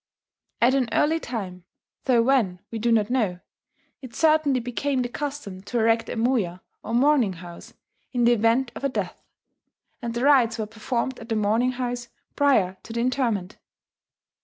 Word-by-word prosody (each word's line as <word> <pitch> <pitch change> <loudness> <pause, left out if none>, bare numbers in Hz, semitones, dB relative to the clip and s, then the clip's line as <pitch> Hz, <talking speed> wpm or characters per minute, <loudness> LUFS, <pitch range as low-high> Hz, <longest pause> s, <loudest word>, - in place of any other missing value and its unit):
At 250 +2 +5
an 260 -4 +1
early 320 +2 +2
time, 190 - -6 0.4
though 240 -3 +4
when 230 -9 +2
we 225 - -4
do 235 +2 +1
not 220 -1 +2
know, 210 -9 0 0.6
it 255 -4 -10
certainly 310 -4 +3
became 255 +2 -1
the 245 - -3
custom 275 -9 -5
to 240 - -3
erect 225 0 +2
a - - -4
moya, 225 -7 0 0.2
or 230 - -3
"mourning 255 -5 +3
house" 175 0 -11 0.4
in 245 -2 0
the 235 - +5
event 235 +3 +2
of - - -9
a 275 - +2
death; - - -4 0.8
and 235 -1 -4
the 240 - -1
rites 255 -6 +4
were 220 - -2
performed 235 +4 -3
at 230 - -11
the 225 - 0
mourning 220 +4 +1
house 245 -1 -3 0.3
prior 215 -11 +3
to 225 - -9
the 235 - -2
interment. 235 -6 -1
235 Hz, 170 wpm, -24 LUFS, 220-260 Hz, 0.8 s, At